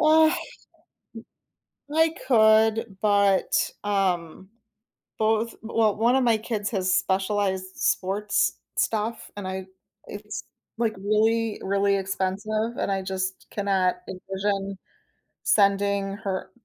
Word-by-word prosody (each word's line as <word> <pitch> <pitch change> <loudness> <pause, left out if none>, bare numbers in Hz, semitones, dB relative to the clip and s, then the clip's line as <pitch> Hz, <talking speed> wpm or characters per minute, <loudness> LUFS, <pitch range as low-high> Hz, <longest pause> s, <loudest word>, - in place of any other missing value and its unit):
M 315 0 +6 1.7
I 320 0 +4
could 220 -2 +4
but, 200 -2 +3
um, 190 -3 -1 0.7
both 220 +1 +1
well, 220 -2 +1
1 235 +4 +3
of 265 - +2
my 230 - +4
kids 215 -2 -3
has 185 -3 +1
specialized 190 0 0
sports 200 +3 0 0.2
stuff 225 +1 -1
and 200 -2 -5
I 190 0 -4 0.4
it's, 210 +1 -7 0.3
like, 230 -2 0
really, 215 +2 +1
really 200 +1 +2
expensive 200 +4 -2
and - - -1
I 195 - 0
just 190 0 -4
cannot 195 -3 +1
envision 195 +1 -3 0.7
sending 200 -1 +2
her 195 -3 -4
205 Hz, 105 wpm, -25 LUFS, 190-220 Hz, 1.7 s, M